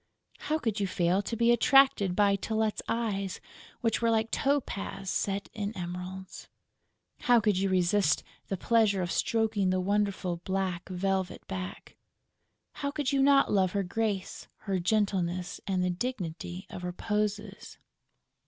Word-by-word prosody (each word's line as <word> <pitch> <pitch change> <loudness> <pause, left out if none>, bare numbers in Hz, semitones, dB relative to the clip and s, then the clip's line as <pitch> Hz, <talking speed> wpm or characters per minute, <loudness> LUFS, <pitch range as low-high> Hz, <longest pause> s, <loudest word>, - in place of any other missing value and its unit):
How 310 - 0
could 225 -8 -2
you 200 - 0
fail 180 +1 +1
to 230 - -4
be 235 +1 +4
attracted 240 -6 +5
by 200 0 +4
Tylette's 220 +1 -1
eyes, 200 -5 -1 0.4
which 230 -3 +1
were 230 - +3
like 225 0 +1
topaz 200 -8 -1
set 200 +1 -1
in 210 0 -4
emeralds? 180 +1 -6 0.7
How 245 -1 +5
could 210 -2 +2
you 195 0 +1
resist 185 +2 +2 0.2
the 195 - -2
pleasure 210 -2 +2
of 175 - -3
stroking 220 -4 +1
the 185 0 +1
wonderful 195 -2 0
black 185 0 -3
velvet 190 0 -2
back? 185 -1 -6 0.8
How 280 - -3
could 285 -2 -1
you 275 -1 +2
not 275 0 +5
love 190 -2 +2
her 200 -1 +1
grace, 200 0 -2 0.2
her 195 -2 0
gentleness 185 -2 0
and 185 -2 +1
the 180 - +1
dignity 180 -4 -4
of 180 - -7
her 180 0 -4
poses? 210 0 -3
200 Hz, 145 wpm, -29 LUFS, 185-220 Hz, 0.8 s, attracted